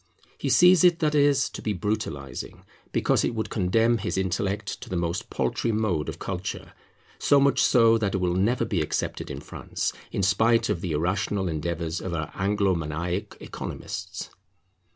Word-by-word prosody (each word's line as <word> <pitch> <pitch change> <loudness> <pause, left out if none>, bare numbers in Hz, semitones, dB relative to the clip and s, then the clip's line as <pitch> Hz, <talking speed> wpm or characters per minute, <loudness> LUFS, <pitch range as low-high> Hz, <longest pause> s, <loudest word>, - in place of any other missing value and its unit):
He - - -1
sees 180 +1 +6
it, 175 -2 +6
that 155 -2 +1
is, 145 -2 +4
to - - -7
be 105 - -1
brutalizing, 85 - -4 0.3
because - - +2
it 120 - -1
would 110 - -3
condemn 115 +4 +2
his 95 - -2
intellect 100 +2 -2
to - - -9
the 95 - -3
most 85 0 -2
paltry 115 - -1
mode 105 -9 0
of - - -6
culture, 95 0 -5 0.5
so 145 - +4
much 140 -1 +3
so 115 -2 +5
that 100 -3 0
it - - +2
will 90 -2 0
never 105 +8 +1
be 100 -7 0
accepted 75 - -3
in - - -6
France, - - -4 0.2
in 100 - -1
spite 110 +4 +3
of 85 - -1
the 90 -4 -2
irrational 95 +4 0
endeavours 85 +1 -3
of 90 -2 -3
our 80 -1 -3
Anglo 100 0 +1
maniac 85 +5 -3
economists. - - -6
100 Hz, 170 wpm, -26 LUFS, 85-115 Hz, 0.5 s, sees